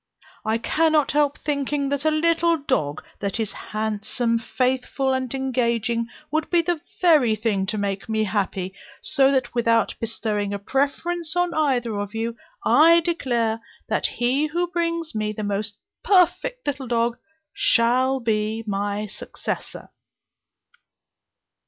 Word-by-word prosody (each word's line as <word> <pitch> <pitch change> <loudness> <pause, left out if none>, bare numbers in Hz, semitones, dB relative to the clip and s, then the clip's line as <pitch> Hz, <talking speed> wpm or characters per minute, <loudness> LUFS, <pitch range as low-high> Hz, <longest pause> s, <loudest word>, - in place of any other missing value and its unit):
I 220 +1 +1
cannot 310 +4 +2
help 290 -1 +2
thinking, 285 -1 -1
that 285 +1 -1
a - - +5
little 335 +2 +2
dog, 155 - -1 0.2
that 200 +2 -2
is 220 -2 -1
handsome, 220 +2 -2
faithful, 260 +2 0
and 260 -2 -2
engaging, 235 -3 0 0.2
would 310 +1 0
be 345 -1 +3
the 340 -2 -1 0.2
very 300 -11 +5
thing 205 -3 0
to 215 +2 -2
make 200 0 -3
me 220 0 +1
happy; 190 -2 -2 0.3
so 275 -3 +3
that 260 -3 0
without 230 -2 +2
bestowing 210 -3 -2
a - - -2
preference 305 - -1
on 355 -1 +1
either 245 -8 +1
of 205 +1 -5
you, 230 +1 -2 0.3
I 335 +2 +6
declare 240 -10 0 0.3
that - - +1
he 260 +5 +1
who 345 +3 0
brings 335 -2 -1
me 215 0 -1
the 215 - -5
most 205 +1 -2 0.3
perfect 395 +7 +2
little 280 -2 -3
dog 235 +1 0 0.3
shall 260 -7 +3
be 220 -1 -1
my 205 0 -2
successor." 210 - -6
245 Hz, 135 wpm, -23 LUFS, 215-305 Hz, 0.3 s, I